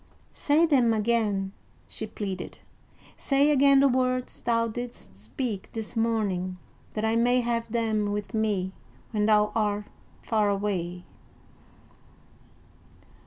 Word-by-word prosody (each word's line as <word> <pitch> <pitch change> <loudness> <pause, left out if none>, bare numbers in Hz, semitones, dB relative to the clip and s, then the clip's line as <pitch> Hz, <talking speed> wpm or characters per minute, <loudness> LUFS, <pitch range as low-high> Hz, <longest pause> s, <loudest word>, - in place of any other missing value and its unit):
"Say 300 +3 +3
them 250 -8 +3
again," 210 -3 0 0.4
she 220 - -5
pleaded, 195 -4 -5 0.6
"say 280 +1 +3
again 275 -1 +5
the 280 - +6
words 255 -1 0
thou 230 -1 +1
didst 235 - -7
speak 190 - -5
this 225 +1 -6
morning, 205 -5 0 0.4
that 215 0 -1
I 220 +1 +1
may 245 +2 +3
have 235 -1 -2
them 220 -3 0
with 205 +2 -4
me 210 -4 0 0.4
when 210 -2 +1
thou 210 -1 +4
art 210 -2 0 0.4
far 215 -2 +1
away." 185 -3 -2
220 Hz, 120 wpm, -27 LUFS, 205-240 Hz, 0.6 s, the